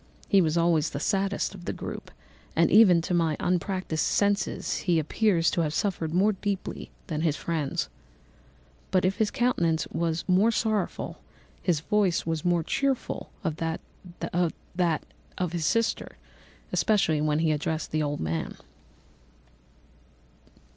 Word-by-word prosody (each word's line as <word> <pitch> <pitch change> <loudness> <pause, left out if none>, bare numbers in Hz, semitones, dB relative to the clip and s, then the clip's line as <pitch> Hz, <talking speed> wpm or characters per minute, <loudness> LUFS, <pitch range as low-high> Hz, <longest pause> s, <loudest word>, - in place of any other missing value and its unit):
He 195 - +5
was 160 -1 +1
always 165 -2 +3
the 140 - -5
saddest 195 +4 0
of 180 -3 -11
the - - -1
group, - - -7 0.5
and - - +3
even 185 -6 +7
to 180 - -2
my 165 -3 +2
unpractised 180 -2 -1
senses, 200 -2 +1
he 175 -3 +1
appeared 170 +3 +1
to 170 - +1
have 155 -1 -1
suffered 175 -6 -1
more 190 +5 +3
deeply 200 -1 -4 0.2
than 155 -3 -3
his 160 -3 +1
friends. 155 -5 -2 1.0
But 185 -1 +2
if 190 +1 +1
his 215 -2 +2
countenance 170 -10 +1
was 165 0 -1
more 190 +4 +4
sorrowful, 215 -3 -1 0.4
his 170 -5 +1
voice 195 -1 +1
was 160 -2 -2
more 175 -2 +2
cheerful 270 - -1
than 165 -1 -2 0.4
that 175 -1 -1 0.3
of 180 -3 -1
his 165 -2 0
sister, 230 -1 0 0.5
especially 195 -8 +2
when 150 0 +1
he 160 0 +2
addressed 155 +1 -2
the 155 - +1
old 145 -1 -1
man. 80 +1 -2
170 Hz, 140 wpm, -27 LUFS, 160-195 Hz, 1.0 s, even